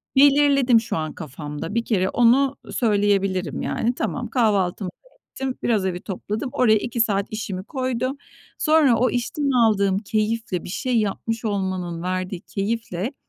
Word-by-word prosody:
belirledim 275 -3 +5
şu 230 -6 -3
an 155 -1 -3
kafamda. 150 - -7
Bir 235 0 0
kere 190 -4 +1
onu 260 +3 +4 0.2
söyleyebilirim, 200 - +1
yani. 235 +2 -1
Tamam, 245 0 -3
kahvaltımı 205 -5 +1
da - - -22 0.2
ettim. 265 -1 -3
Biraz 215 -5 +1
evi 180 -1 -2
topladım. 210 +6 -4
Oraya 235 -6 +4
2 235 +2 -1
saat 200 -3 +1
işimi 205 -4 -4
koydum. 255 +2 -2 0.4
Sonra 305 -6 +4
o 250 +3 +3
işten 275 +4 -1
aldığım 205 -6 +3
keyifle, 215 -3 -1
bir - - -8
şey 250 +4 -1
yapmış 225 +2 -2
olmanın 185 -4 -2
verdiği 185 0 -3
keyifle 220 +1 -3
220 Hz, 145 wpm, -23 LUFS, 190-245 Hz, 0.4 s, belirledim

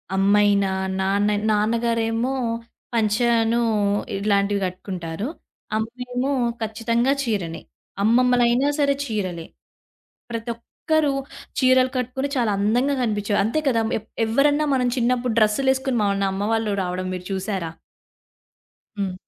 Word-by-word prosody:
అమ్మయినా, 200 0 +3 0.3
నాన్న 200 +2 +1 0.2
నాన్నగారేమో 230 +3 +1 0.6
పంచానూ 230 +1 +2 0.6
ఇలాంటివి 200 0 +1
గట్టుకుంటారు. 185 +1 -5 0.5
అమ్మేమో 250 +4 -3 0.3
ఖచ్చితంగా 230 +3 0
చీరనే. 190 -8 -2 0.4
అమ్మమ్మలైనా 245 +3 +3
సరే 280 -1 +3
చీరలే. 185 -8 -3 0.9
ప్రతొక్కరు 235 +6 -1 0.5
చీరలు 255 -1 +4
కట్టుకొనే 255 +3 -2
చాలా 230 -4 +2
అందంగా 245 +7 +2
గనిపించేవారు. 205 -3 0
అంతే 310 +8 0
కదా! 230 -3 +2 0.2
ఎప్ 220 - -23 0.2
ఎవరన్నా 290 +6 +2
మనం 250 -1 +1
చిన్నప్పుడు 245 -1 +1
డ్రెస్సులేసుకొని 265 +4 +2
మన 200 -1 +1
అమ్మవాళ్ళు 210 +1 0
రావడం 185 +1 -3
మీరు 180 -1 -6
చూశారా? 190 -3 -3 1.3
హ్మ్. 190 -2 -1
225 Hz, 95 wpm, -23 LUFS, 200-250 Hz, 1.3 s, చీరలు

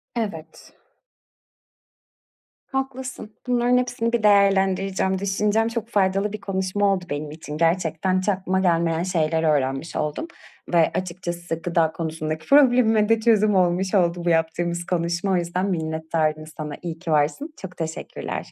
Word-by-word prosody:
Evet. 200 -9 -5 1.9
Haklısın. 265 -4 -5
Bunların 245 0 +3
hepsini 245 -2 -1
bir 235 -2 +1
değerlendireceğim, 195 -1 +3
düşüneceğim. 210 +3 +1
Çok 230 -1 -3
faydalı 195 0 +1
bir 215 - -6
konuşma 195 +1 0
oldu 180 -2 -3
benim 145 +1 -4
için. 150 -1 -7
Gerçekten 170 +2 +1
hiç 190 +3 -1
aklıma 190 -1 0
gelmeyen 170 -2 +1
şeyler 165 -3 0
öğrenmiş 140 0 0
oldum 150 - -2 0.5
ve - - +4 0.2
açıkçası 175 -2 -4
gıda 165 -2 +1
konusundaki 160 -1 -4
problemime 245 -6 +5
de 225 -1 +4
çözüm 215 -3 +3
olmuş 185 +2 +2
oldu 175 -1 +1
bu 175 - +2
yaptığımız 170 +1 0
konuşma. 175 +2 -1
O - - +3
yüzden 180 +3 -1
minnettarım 160 -2 -1
sana. 150 -1 -5
İyi 165 -2 -5
ki 170 -3 -4
varsın. 155 - 0
Çok 180 -1 -9
teşekkürler. 160 -1 -5
185 Hz, 135 wpm, -23 LUFS, 165-205 Hz, 1.9 s, problemime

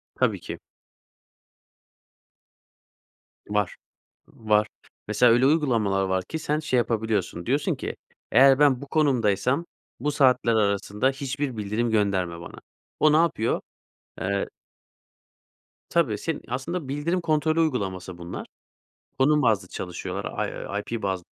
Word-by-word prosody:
Tabii - - +1
ki. - - -7 2.9
Var, 105 -3 0 0.5
var. 105 -1 +1 0.4
Mesela 115 +3 +4
öyle 120 +3 +4
uygulamalar 115 -10 +2
var 95 -1 0
ki 160 - -5
sen 150 -1 -1
şey 150 -5 0
yapabiliyorsun, 110 -7 -1
diyorsun 140 +4 +1
ki, - - -5 0.4
"Eğer 135 0 +6
ben 140 -3 +4
bu 140 - -8
konumdaysam 130 - +1 0.3
bu 150 - 0
saatler 130 -5 +3
arasında 105 +3 +1
hiçbir 135 -1 -3
bildirim 110 +3 -1
gönderme 95 -5 0
bana." 85 - -10 0.4
O 155 -1 +5
ne - - +6
yapıyor? 160 -9 +1 0.6
Eee 100 +1 -1 1.4
Tabii, 145 -12 +2
seni 165 +7 -3
aslında 140 +6 -3
bildirim 150 +6 -1
kontrolü 155 0 +1
uygulaması 95 - -1
bunlar. 85 +1 -7 0.7
Konum 150 +2 +4
bazlı 110 -6 +2
çalışıyorlar, 90 -1 -4 0.3
I - - 0 0.2
IP 115 - -4
bazlı 95 -2 -2
120 Hz, 120 wpm, -25 LUFS, 100-145 Hz, 2.9 s, Eğer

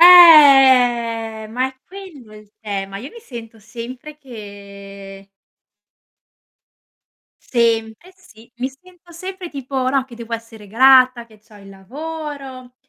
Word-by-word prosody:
Eh! 260 -10 +6
Ma 250 +3 -2
è 265 - -17
quello 340 - -13
il 210 -1 -17
tema. 195 -2 -6
Io 265 +7 -10
mi 470 - -14
sento 230 - -12
sempre 245 +7 -10
che 200 -5 -13 2.2
Sempre, 230 +6 -1
sì, 235 - -20
mi 255 +2 -3
sento 350 +5 -21
sempre 370 +1 -9
tipo, 265 -2 -4
no, 270 -1 0
che 250 -3 -15
devo 235 0 -11
essere 225 -2 -8
grata, 255 +1 +4
che 215 -2 -21
c'ho 215 -1 -20
il 195 -1 -16
lavoro, 270 +3 -9
245 Hz, 120 wpm, -18 LUFS, 220-280 Hz, 2.2 s, Eh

